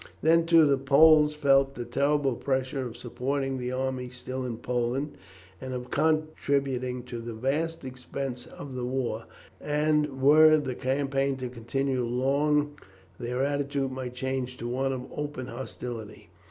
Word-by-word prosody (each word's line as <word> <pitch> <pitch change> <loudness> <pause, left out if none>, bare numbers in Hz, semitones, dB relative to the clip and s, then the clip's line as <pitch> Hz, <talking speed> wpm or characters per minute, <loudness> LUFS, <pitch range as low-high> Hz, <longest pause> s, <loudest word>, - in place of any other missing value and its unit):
Then, 165 +1 +4
too, 165 -2 +7
the 140 -2 +3
Poles 150 +2 +6
felt 135 -2 +3
the 120 - -5
terrible 140 0 +1
pressure 130 +1 -1
of 115 - -9
supporting 135 +2 -2
the 125 0 -3
army 130 -1 -2
still 130 +1 -5
in 115 -2 -4
Poland, 125 +4 -2 0.5
and 130 -1 -4
of 125 0 -6
contributing 140 -5 0
to 120 -1 -6
the 115 0 -6
vast 150 +8 -1
expenses 130 0 -6
of 140 -2 -8
the 125 -1 -4
war, 125 -3 -2 0.3
and 150 -2 +1
were 155 +3 +7
the 135 -4 -2
campaign 135 +1 0
to 130 -1 -4
continue 125 +2 -1
long 145 +4 +1 0.4
their 125 +2 -1
attitude 140 -1 -1
might 130 -1 -5
change 130 -1 -3
to 120 - -5
one 135 +2 0
of 130 -1 -4
open 145 -3 -4
hostility. 120 -2 -7
135 Hz, 150 wpm, -28 LUFS, 125-145 Hz, 0.5 s, too